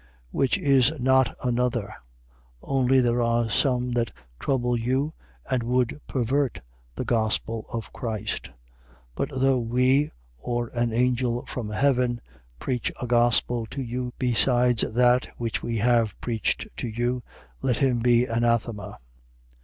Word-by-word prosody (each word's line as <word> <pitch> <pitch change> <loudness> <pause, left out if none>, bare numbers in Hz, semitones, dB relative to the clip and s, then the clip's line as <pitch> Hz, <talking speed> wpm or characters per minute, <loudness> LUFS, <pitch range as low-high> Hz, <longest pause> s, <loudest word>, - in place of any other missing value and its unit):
1:7. - - -28 0.2
Which 135 -2 +1
is 135 0 +4
not 130 0 +3
another: 120 -3 0 0.7
only 135 -1 +3
there 120 0 +2
are 115 -1 +1
some 125 +1 +1
that 120 -1 0 0.3
trouble 125 -3 0
you 130 +6 0 0.3
and 130 -2 0
would 125 +4 0
pervert 130 +1 0 0.4
the - - -3
gospel 110 0 0
of 115 -2 -5
Christ. 110 -2 -3
1:8. - - -22 0.6
But - - -2
though 130 0 +3
we, 125 +5 +2 0.3
or 120 - -2
an 120 -1 0
angel 120 0 +1
from 115 -4 -5
heaven, 125 +1 +1 0.4
preach 125 - -2
a - - -3
gospel 120 -1 +2
to 135 +4 -5
you 125 +1 -4
besides 125 -1 +3
that 125 +2 +3
which 115 -2 -2
we 115 -1 -2
have 115 -2 +2
preached 115 -4 -1
to - - -3
you, 120 +2 -1 0.4
let 125 -3 +1
him 130 -3 +2
be 120 +1 +4
anathema. 115 -3 -1
120 Hz, 140 wpm, -25 LUFS, 115-125 Hz, 0.7 s, is